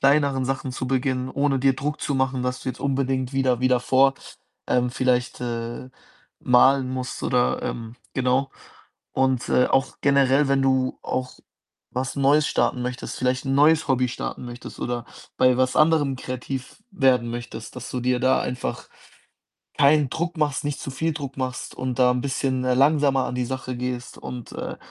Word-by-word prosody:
kleineren 140 Hz, -2 st, +3 dB
Sachen 135 Hz, 0 st, -2 dB
zu 130 Hz, +1 st, -4 dB
beginnen, 130 Hz, 0 st, 0 dB
ohne 140 Hz, 0 st, +1 dB
dir 135 Hz, 0 st, +3 dB
Druck 150 Hz, +3 st, -3 dB
zu 140 Hz, -, -1 dB
machen, 130 Hz, -1 st, 0 dB
dass 125 Hz, 0 st, -2 dB
du -, -, -3 dB
jetzt 125 Hz, -, -5 dB
unbedingt 135 Hz, -1 st, -1 dB
wieder 130 Hz, -3 st, +1 dB
wieder 130 Hz, -1 st, +3 dB
vor 135 Hz, +2 st, +4 dB, 0.5 s
ähm, 125 Hz, 0 st, +2 dB
vielleicht, 125 Hz, -1 st, 0 dB
äh, 120 Hz, +1 st, -4 dB, 0.5 s
malen 130 Hz, +1 st, +4 dB
musst 130 Hz, -1 st, -4 dB
oder 125 Hz, 0 st, +1 dB
ähm, 115 Hz, 0 st, -5 dB, 0.2 s
genau. 130 Hz, +1 st, +1 dB, 0.6 s
Und, 130 Hz, -2 st, +1 dB
äh, 125 Hz, -, +4 dB
auch 135 Hz, 0 st, +1 dB
generell, 140 Hz, 0 st, +4 dB
wenn 135 Hz, 0 st, +2 dB
du 130 Hz, -1 st, +1 dB
auch 130 Hz, 0 st, -4 dB, 0.5 s
was 130 Hz, +2 st, -3 dB
Neues 145 Hz, +2 st, +4 dB
starten 120 Hz, +1 st, 0 dB
möchtest, 125 Hz, 0 st, -5 dB
vielleicht 130 Hz, +2 st, 0 dB
'n 135 Hz, -, +1 dB
neues 150 Hz, +1 st, +4 dB
Hobby 130 Hz, -1 st, +2 dB
starten 125 Hz, -, -5 dB
möchtest 120 Hz, 0 st, -9 dB
oder 120 Hz, -1 st, -3 dB, 0.3 s
bei 130 Hz, -1 st, +5 dB
was 130 Hz, 0 st, +1 dB
anderem 155 Hz, -4 st, +3 dB
kreativ 130 Hz, -, -6 dB
werden 130 Hz, -8 st, +2 dB
möchtest, 120 Hz, 0 st, -7 dB
dass 125 Hz, -, -7 dB
du 125 Hz, -, -3 dB
dir 125 Hz, 0 st, +1 dB
da 130 Hz, -, +3 dB
einfach 125 Hz, 0 st, -4 dB, 0.9 s
keinen 145 Hz, -1 st, +4 dB
Druck 170 Hz, +1 st, -3 dB
machst, 150 Hz, -3 st, 0 dB
nicht 145 Hz, -1 st, -2 dB
zu -, -, -5 dB
viel 160 Hz, +4 st, -1 dB
Druck 140 Hz, -3 st, -6 dB
machst 130 Hz, -1 st, -4 dB
und 130 Hz, 0 st, -3 dB
da 125 Hz, 0 st, +6 dB
'n 125 Hz, -, 0 dB
bisschen, 130 Hz, -2 st, -1 dB
äh, 125 Hz, -, +2 dB
langsamer 140 Hz, -1 st, +3 dB
an 125 Hz, -, -4 dB
die 125 Hz, -1 st, -1 dB
Sache 130 Hz, -1 st, -4 dB
gehst 125 Hz, -1 st, -4 dB
und, 125 Hz, -2 st, -8 dB
äh, -, -, -5 dB
130 Hz, 175 wpm, -24 LUFS, 125-135 Hz, 0.9 s, da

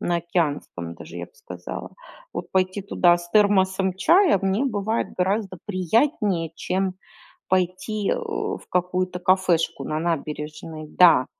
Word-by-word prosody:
на 175 Hz, -, 0 dB
океанском 150 Hz, -, -2 dB
даже, -, -, -11 dB
я -, -, -5 dB
бы -, -, -30 dB
сказала. 470 Hz, -1 st, -8 dB, 0.4 s
Вот -, -, -6 dB
пойти 185 Hz, +1 st, 0 dB
туда 175 Hz, -3 st, +4 dB
с 175 Hz, 0 st, -10 dB
термосом 190 Hz, -2 st, +3 dB
чая 345 Hz, -, +4 dB
мне 195 Hz, +7 st, +1 dB
бывает 220 Hz, -2 st, -1 dB
гораздо 190 Hz, 0 st, 0 dB
приятнее, 200 Hz, -, +1 dB
чем 190 Hz, 0 st, -1 dB, 0.5 s
пойти, 185 Hz, +3 st, 0 dB
э, -, -, +1 dB
в 445 Hz, -3 st, -3 dB
какую-то 180 Hz, 0 st, -1 dB
кафешку 185 Hz, -3 st, +2 dB
на 155 Hz, +1 st, -2 dB
набережной. 155 Hz, -1 st, -4 dB
Да. 165 Hz, -6 st, +6 dB
185 Hz, 130 wpm, -24 LUFS, 170-200 Hz, 0.5 s, Да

